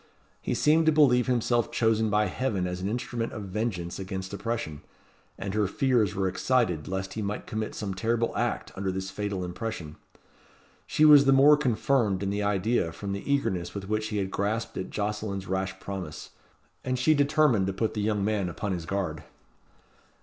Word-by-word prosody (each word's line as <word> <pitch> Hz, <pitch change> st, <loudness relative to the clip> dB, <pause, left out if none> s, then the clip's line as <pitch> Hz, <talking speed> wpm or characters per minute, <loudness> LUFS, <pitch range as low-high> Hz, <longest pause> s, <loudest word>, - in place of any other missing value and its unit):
He -, -, -2 dB
seemed 160 Hz, +2 st, +3 dB
to -, -, +7 dB
believe 135 Hz, -5 st, +4 dB
himself 120 Hz, -2 st, +1 dB
chosen 110 Hz, -1 st, +2 dB
by 105 Hz, +1 st, +3 dB
Heaven 105 Hz, -9 st, -1 dB
as 90 Hz, 0 st, -4 dB
an 95 Hz, -, -1 dB
instrument 120 Hz, 0 st, -3 dB
of 105 Hz, -, -5 dB
vengeance 95 Hz, -3 st, -3 dB
against 95 Hz, 0 st, -5 dB
oppression; 100 Hz, -9 st, -3 dB, 0.6 s
and 95 Hz, 0 st, -4 dB
her 105 Hz, -1 st, +2 dB
fears 115 Hz, -2 st, +1 dB
were 95 Hz, -1 st, +1 dB
excited 95 Hz, -, 0 dB
lest 95 Hz, 0 st, -3 dB
he 110 Hz, -, -4 dB
might 105 Hz, 0 st, -3 dB
commit 110 Hz, 0 st, -4 dB
some 100 Hz, -3 st, -3 dB
terrible 115 Hz, +4 st, 0 dB
act -, -, -1 dB
under 95 Hz, 0 st, -2 dB
this 95 Hz, 0 st, -4 dB
fatal 100 Hz, -2 st, -3 dB
impression. 90 Hz, -5 st, -5 dB, 0.9 s
She 155 Hz, -, +3 dB
was 145 Hz, -2 st, +8 dB
the 135 Hz, -, +5 dB
more 140 Hz, +2 st, +7 dB
confirmed 120 Hz, -7 st, +1 dB
in 100 Hz, -, -1 dB
the 100 Hz, +1 st, -1 dB
idea 100 Hz, -2 st, +1 dB
from 100 Hz, +4 st, -6 dB
the 100 Hz, +8 st, -3 dB
eagerness 90 Hz, -11 st, 0 dB
with 100 Hz, -1 st, -5 dB
which 110 Hz, 0 st, 0 dB
he 105 Hz, -, -3 dB
had 95 Hz, -1 st, -2 dB
grasped 110 Hz, +4 st, -2 dB
at 95 Hz, -, -4 dB
Jocelyn's 105 Hz, -2 st, -3 dB
rash 95 Hz, 0 st, -2 dB
promise, 90 Hz, -7 st, -6 dB, 0.5 s
and 130 Hz, 0 st, -1 dB
she 145 Hz, +5 st, +4 dB
determined 145 Hz, -8 st, +3 dB
to 95 Hz, -, -1 dB
put 110 Hz, +3 st, -1 dB
the 105 Hz, -, -2 dB
young 105 Hz, -1 st, 0 dB
man 105 Hz, -4 st, 0 dB
upon 100 Hz, +3 st, -4 dB
his 85 Hz, -3 st, -4 dB
guard. 90 Hz, -6 st, -2 dB
105 Hz, 185 wpm, -27 LUFS, 95-120 Hz, 0.9 s, was